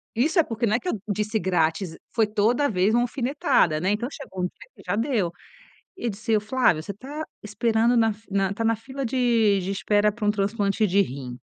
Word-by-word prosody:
Isso 305 - +2
é - - +6
porque 230 -3 -2
não 215 -1 +2
é - - +1
que 365 - -4
eu 215 - -2
disse: 210 +2 -1
"grátis", 165 -1 0 0.2
foi 225 - +3
toda 225 +7 +1
vez 195 +1 +2
uma 240 - +4
alfinetada, 245 - +1
né, 185 +5 +1
então 235 +5 -1
chegou 190 -10 -7
um - - +3
dia - - -9
que - - -15
já 180 +3 0
deu 225 -7 0 0.6
e 240 -10 -3
disse: 220 +2 0
"Flávio, 215 -6 +2
você 200 - -6
tá 285 +9 -7 0.2
esperando 225 +3 +1
na 225 -2 +3
fi 215 +2 -22
na 195 -1 +1
tá 225 - -3
na 225 0 +2
fila 265 +5 -6
de 230 -5 +2
de 190 +2 -3
espera 205 +2 +2
pra 215 0 -5
um 210 - +4
transplante 205 0 0
de 195 +3 +3
rim". 130 -7 -5
215 Hz, 220 wpm, -25 LUFS, 195-235 Hz, 0.6 s, é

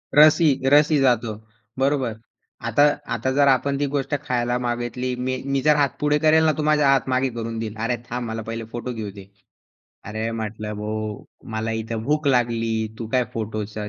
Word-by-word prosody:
रसही 150 -2 +6
रसही 150 +1 +5
जातो. 120 -4 +2 0.5
बरोबर. 135 -4 +1 0.5
आता 145 - +2 0.3
आता 120 +3 -1
जर 140 +1 +3
आपण 140 +1 +2
ती 145 - +1
गोष्ट 135 0 -2
खायला 120 -2 0
मागितली, 120 +1 -2
मी 130 +1 -3
मी 140 0 0
जर 150 +2 +4
हात 140 -3 +1
पुढे 150 0 +2
करेल 160 +1 +4
ना, 155 - +5
तो 155 - -3
माझा 150 -2 +3
हात 135 -1 +2
मागे 130 +1 +1
करून 115 0 -4
देईल, 110 -1 -4
"अरे 125 0 0
थांब 120 0 -3
मला 110 0 -4
पहिले 115 0 -4
फोटो 120 +1 -4
घेऊ 110 -3 -5
दे." 100 -1 -12 0.8
अरे 110 +2 -3
म्हटलं, 105 0 -5
"भाऊ 105 0 -4 0.3
मला 110 +1 -2
इथे 115 0 -4
भूक 150 0 +1
लागली, 115 -3 +1 0.3
तू 115 - -4
काय 125 -1 +3
फोटोचं 110 -1 -4
125 Hz, 180 wpm, -23 LUFS, 115-140 Hz, 0.8 s, रसही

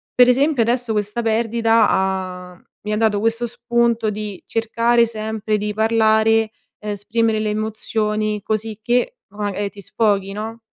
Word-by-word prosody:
per 250 0 +7
esempio, 270 0 +3
adesso 240 0 0
questa 210 +2 -2
perdita 225 0 +2
ha 185 -1 -2 0.3
mi 210 - -1
ha - - 0
dato 215 -2 +2
questo 230 +2 0
spunto 235 -1 0
di 210 -2 -6
cercare 230 +1 +2
sempre 220 -1 -2
di 210 0 -3
parlare, 220 0 +3 0.3
esprimere 215 +2 -1
le 215 0 -1
emozioni 215 0 -2
cosicché 225 - -1
o 205 - -17
magari 205 -1 -2
ti 200 - -12
sfoghi, 200 -1 0
no? 220 +2 -6
220 Hz, 140 wpm, -20 LUFS, 210-230 Hz, 0.3 s, per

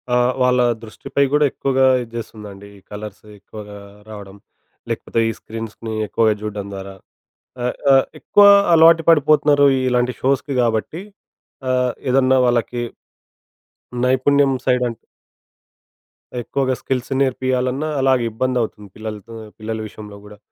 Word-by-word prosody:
ఆహ్, 125 +1 +2
వాళ్ళ 125 0 +3 0.2
దృష్టిపై 115 +5 -2
గూడా 150 0 +3
ఎక్కువగా 135 -1 +1 0.2
ఇది 115 -2 -9
జేస్తుందండి. 105 -3 -9
ఈ - - -17
కలర్స్ 105 0 -8 0.2
ఎక్కువగా 105 0 -11 0.3
రావడం. 100 -2 -10 0.5
లేకపోతే - - -2
ఈ - - -1
స్క్రీన్స్‌ని 115 0 -7
ఎక్కువగా 110 +1 +2
జూడ్డం 105 -2 -5
ద్వారా. 95 0 -8 0.7
ఆహ్, 125 - -1 0.2
ఆహ్, 135 - +5
ఎక్కువ 205 - +4 0.3
అలవాటు 165 0 +6
పడిపోతున్నారు 150 -2 +4 0.2
ఇలాంటి 125 0 +1
షోస్‌కి 135 +1 0
గాబట్టి 115 +8 -1 0.7
ఆహ్, 125 -1 +1 0.2
ఏదన్నా 130 0 +3
వాళ్ళకి 120 0 0 1.2
నైపుణ్యం 135 +2 +3
సైడ్ 125 -1 +2
అం - - -5 1.5
ఎక్కువగా 130 +2 -1
స్కిల్స్ 130 -1 -3
నేర్పియ్యాలన్నా 130 +2 -1
అలాగే 130 -2 +2
ఇబ్బంది 130 +3 -1
అవుతుంది 105 -2 -6
పిల్లలతో 110 +1 -8 0.2
పిల్లల 110 +1 -4
విషయంలో 105 -1 -11
గూడా. 105 0 -13
125 Hz, 120 wpm, -19 LUFS, 110-130 Hz, 1.5 s, అలవాటు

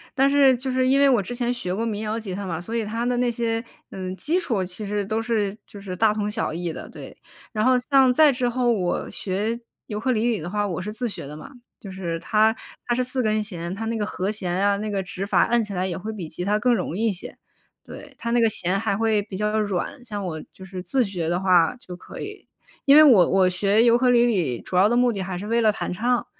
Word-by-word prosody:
但 270 +1 +4
是 275 -2 +5
就 255 +2 -4
是 255 0 +1
因 275 +2 +4
为 280 - +5
我 245 -6 +3
之 240 +6 -5
前 245 0 0
学 180 -7 -3
过 225 +3 -2
民 210 -2 -3
谣 220 +1 -2
吉 205 -5 -6
他 200 +1 -5
嘛， 165 -3 -3
所 200 +7 -5
以 225 -2 -1
它 230 +3 -3
的 245 0 0
那 245 0 +2
些， 230 -1 -1 0.3
嗯， 185 -1 -5
基 325 - 0
础 225 - -1
其 185 +4 -5
实 205 0 -2
都 220 +2 -1
是 215 -4 -1
就 205 - -12
是 185 -2 -6
大 215 +2 +3
同 210 -1 -2
小 210 -6 -2
异 170 0 -3
的， - - -8
对。 - - -11 0.4
然 215 -2 0
后 255 0 +5
像 265 0 +4
再 305 +1 +6
之 250 -1 -1
后 245 0 +1
我 185 -6 -1
学 210 +5 -2 0.3
尤 210 -1 -4
克 260 +3 0
里 220 -3 +1
里 230 -3 0
的 165 +2 -6
话， 205 +1 -1
我 180 -1 -3
是 210 - -5
自 240 +2 -3
学 170 - -7
的 150 - -8
嘛。 155 - -11 0.3
就 195 - -9
是 175 -3 -4
它 220 +4 +2 0.3
它 240 - +1
是 255 - +1
4 255 +1 -1
根 215 -2 +1
弦， 175 -4 -5
它 225 +2 -5
那 230 +1 -2
个 215 - -1
和 195 0 -2
弦 190 -4 -3
啊， 200 +2 +2
那 215 +1 -4
个 195 -2 -2
指 195 0 -5
法 - - +3
按 235 -1 +2
起 210 - -7
来 185 0 -1
也 175 -3 -3
会 215 +4 -5
比 195 -7 -6
吉 160 +3 -6
他 205 +3 +1
更 245 +3 +2
容 180 -5 -2
易 225 - 0
一 - - +2
些。 185 - -8 0.5
对， 285 -2 -12
它 235 0 -4
那 240 - +3
个 225 - +4
弦 190 -1 0
还 210 -2 -1
会 220 -1 +2
比 200 -2 -8
较 210 +1 0
软， 205 +5 -3
像 205 -5 -5
我 160 -3 -4
就 190 - -12
是 190 -1 -7
自 260 +7 +1
学 175 -5 -3
的 175 - 0
话 180 +1 +3
就 185 -8 -10
可 - - -11
以。 415 0 -8 0.4
因 280 +1 +7
为 310 - +10
我 225 - +6
我 190 -1 +4
学 200 +4 +2
尤 235 -1 +5
克 250 0 +2
里 240 -1 +5
里 175 - 0
主 - - -7
要 190 +3 +5
的 240 - +1
目 245 0 +4
的 195 - -4
还 180 -1 -4
是 200 - -6
为 230 +2 +1
了 220 -2 +4
弹 210 - -4
唱， 240 +6 0
215 Hz, 290 characters per minute, -23 LUFS, 190-240 Hz, 0.5 s, 为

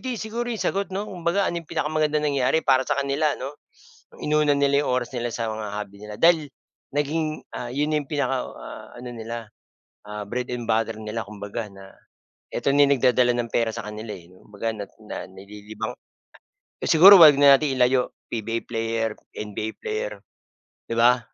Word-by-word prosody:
di 255 -2 -2
siguro 235 +2 -3
'yong 230 - -2
sagot 200 0 -1
'no, 205 - -2
kumbaga 180 +1 0
ano, 170 0 -2
'yong 160 - -19
pinakamagandang 155 -1 0
nangyari 135 +3 +2
para 130 -1 +4
sa - - +1
kanila 140 +2 +1
ano? 140 +3 -7 0.7
Inuna 150 -1 +3
nila 140 0 +3
'yong - - -2
oras 125 0 -1
nila 120 0 -1
sa 115 - -3
mga 110 -1 -5
hobby 100 -1 -6
nila, 105 0 -8
dahil 165 -3 +4 0.5
naging 155 +1 -1
ah, 120 - -5
yun 150 +3 0
na 150 - +2
yung 140 - -10
pinaka 135 -3 0
ah, - - -10
ano 125 0 -8
nila 115 -1 -6 0.6
ah, 105 0 -5
bread 125 +3 -3
and 120 -2 -4
butter 115 0 +1
nila 110 +1 -4
kumbaga 105 +2 -6
na, 95 0 -14 0.5
eto 140 - 0
na 145 - +5
yung 140 -1 +3
nagdadala 125 -1 +3
ng 120 -1 -2
pera 115 -1 +2
sa 105 - -6
kanila 105 +1 -7
e, 85 - -11
'no, 90 - -19
kumbaga 110 +2 -3
na 105 -2 -6 0.2
na - - -6
nalilibang. 105 +2 -8 0.9
Eh - - -2
siguro 190 +5 +10
'wag 150 -3 +9
na 140 -1 +8
natin 150 -1 -1
ilayo, 125 0 +2 0.2
PBA 115 +1 -3
player 115 -1 -2 0.2
NBA 105 +1 -4
player, 445 +3 -3 0.7
di - - -4
ba? 120 +1 +5
125 Hz, 185 wpm, -24 LUFS, 110-150 Hz, 0.9 s, siguro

